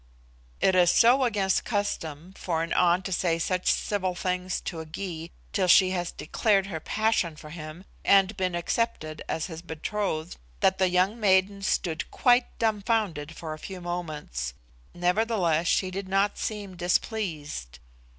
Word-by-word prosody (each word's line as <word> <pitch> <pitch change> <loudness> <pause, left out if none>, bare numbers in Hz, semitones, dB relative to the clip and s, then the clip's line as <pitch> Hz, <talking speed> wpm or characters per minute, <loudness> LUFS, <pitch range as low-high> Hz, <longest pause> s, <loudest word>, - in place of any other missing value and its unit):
It 190 - +4
is 180 -1 +5
so 245 +7 +5
against 200 -5 +1
custom 180 -5 -3
for 165 -2 -1
an 165 - -2
An 180 +1 +3
to 190 - -5
say 170 -2 +1
such 180 +2 +1
civil 185 -3 -1
things 180 0 -2
to 170 - -5
a 160 - -6
Gy 165 0 -5 0.2
till 190 -3 +1
she 185 +1 +6
has 175 -2 -2
declared 200 +3 +1
her 180 -5 -5
passion 215 -5 0
for 150 0 -11
him, 160 +2 -8 0.2
and 195 +1 +4
been 185 -3 -1
accepted 170 -4 -2
as 160 - -1
his 165 -3 -7
betrothed, 170 0 -3 0.2
that 190 - +3
the 190 -1 +3
young 185 +5 +2
maiden 195 -1 +3
stood 170 -4 -1
quite 245 0 +2
dumbfounded 205 -8 0
for 160 -1 -6
a 155 - -9
few 190 +2 -7
moments. 155 - -4 0.4
Nevertheless 175 -3 +1
she 185 +1 +2
did 190 0 -5
not 195 +2 +1
seem 205 -3 -4
displeased. 170 - -2
180 Hz, 155 wpm, -27 LUFS, 165-200 Hz, 0.4 s, she